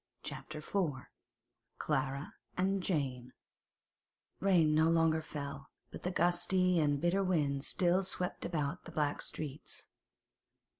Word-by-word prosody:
CHAPTER 155 - -6
IV 155 -1 -1 0.8
CLARA 135 -1 -1 0.2
AND 190 +1 +1
JANE 130 -8 -2 1.1
Rain 175 -6 +4
no 160 +1 +4
longer 165 -1 +3
fell, 140 -2 -6 0.2
but - - -8
the 180 - -1
gusty 180 0 +3
and 145 -2 +2
bitter 175 +5 +2
wind 145 -7 +1
still 180 +2 +2
swept 180 -1 -1
about 150 -5 -2
the - - -8
black 150 -2 0
streets. 150 -1 -6
160 Hz, 115 wpm, -34 LUFS, 145-180 Hz, 1.1 s, Rain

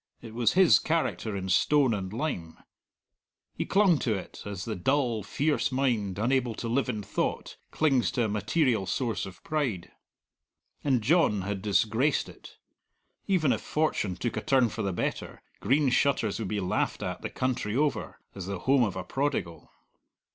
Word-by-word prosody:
It 110 - -11
was 115 -2 +2
his 185 -2 +6
character 155 -9 -1
in 95 -1 -4
stone 140 +4 +3
and 95 -3 -4
lime. 105 - -4 1.0
He - - -4
clung 190 -6 +4
to 110 -4 0
it, 95 - -8
as 100 -2 -5
the 110 - -3
dull, 120 +2 +1
fierce 145 +10 0
mind, 120 -8 0
unable 120 +1 +1
to 115 - -5
live 125 +3 0
in 110 -4 -3
thought, - - -3
clings 135 - +2
to 120 - +1
a - - 0
material 110 - +1
source 115 -7 -2
of 90 -2 -13
pride. 130 - -2 0.9
And 130 -5 +1
John 130 - +3
had 100 0 -3
disgraced 110 +7 +1
it. - - -14 0.7
Even 170 -8 +2
if - - -3
fortune 150 - -1
took 120 +5 -3
a - - -2
turn 130 -3 +3
for 110 - -5
the 100 -2 -1
better, 85 - -4 0.2
Green 135 +6 +2
Shutters 125 -6 +1
would 110 - -3
be 105 +1 -2
laughed 90 -2 -1
at - - -4
the - - -4
country 125 -4 -2
over, 145 +2 -1
as 95 -2 -7
the 100 -1 -3
home 135 0 +3
of 100 -5 -1
a 95 - -4
prodigal. 110 - -3
115 Hz, 170 wpm, -28 LUFS, 100-140 Hz, 1.0 s, his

